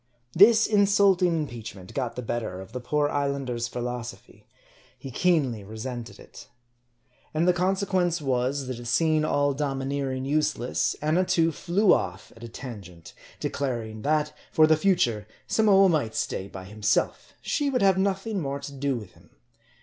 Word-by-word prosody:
This 215 +5 +7
insulting 200 -3 +4
impeachment 115 - -7
got 125 -4 -3
the 125 - -5
better 110 -5 -3
of 95 +1 -10
the 125 - -5
poor 145 +4 0
islander's 140 -5 -2
philosophy. 125 0 -7 0.5
He 135 - -9
keenly 135 - +1
resented 115 +3 -7
it. - - -13 0.9
And 165 +3 +2
the 180 - +5
conse 190 +3 0
quence 175 -3 +1
was, 135 0 -1
that 125 -2 -6
seeing 155 +5 +2
all 145 -2 +1
domineering 135 -1 -2
useless, 150 -3 0
Annatoo 165 +1 +2
flew 185 +5 +2
off 95 +1 -3
at 115 - -14
a 115 - -7
tangent; 100 -10 -10 0.3
declaring 115 -6 -3
that, 150 +2 0 0.2
for 155 - +5
the 155 0 +5
future, 150 - +1 0.2
Samoa 200 -3 +4
might 150 -11 0
stay 95 - -2
by 95 -1 -9
himself; 105 +2 -1
she 290 -2 -1
would 250 -5 0
have 190 -1 +4
nothing 195 +1 -1
more 140 -1 -3
to 140 0 -8
do 140 0 -1
with 105 -6 -8
him. - - -22
140 Hz, 150 wpm, -26 LUFS, 120-175 Hz, 0.9 s, This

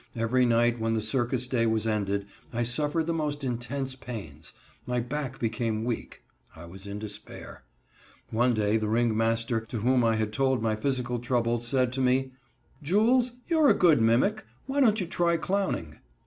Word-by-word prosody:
Every 120 +2 +2
night 120 0 +2
when 115 0 0
the - - +1
circus 120 +3 -1
day 120 -3 +1
was 110 -1 0
ended, 100 -2 -1 0.3
I 120 0 -1
suffered 150 +7 0
the 170 - -1
most 150 -3 -2
intense 130 +2 -3
pains. 95 - -8 0.4
My 125 0 0
back 135 +2 -4
became 115 -1 -1
weak. 120 -1 -4 0.3
I 80 +1 -10
was 95 +4 -11
in 100 +1 -5
despair. 105 -10 -8 0.7
One 120 +2 +2
day 105 0 +2
the 110 -1 -2
ringmaster, 115 0 +1
to 115 +1 -6
whom 125 +2 +3
I 115 -1 +3
had 110 -1 -2
told 130 +1 +1
my 110 -1 0
physical 125 0 -1
troubles, 120 -1 0
said 130 -1 +1
to 135 - -1
me: 130 +1 +2 0.5
"Jules, 230 - +3
you 330 -2 +1
are 295 -3 +6
a - - +5
good 165 -9 +4
mimic. 125 - +2 0.2
Why 275 +2 -2
don't 220 -4 +4
you 185 - -1
try 170 0 +1
clowning?" 170 - -2
120 Hz, 175 wpm, -27 LUFS, 110-135 Hz, 0.7 s, are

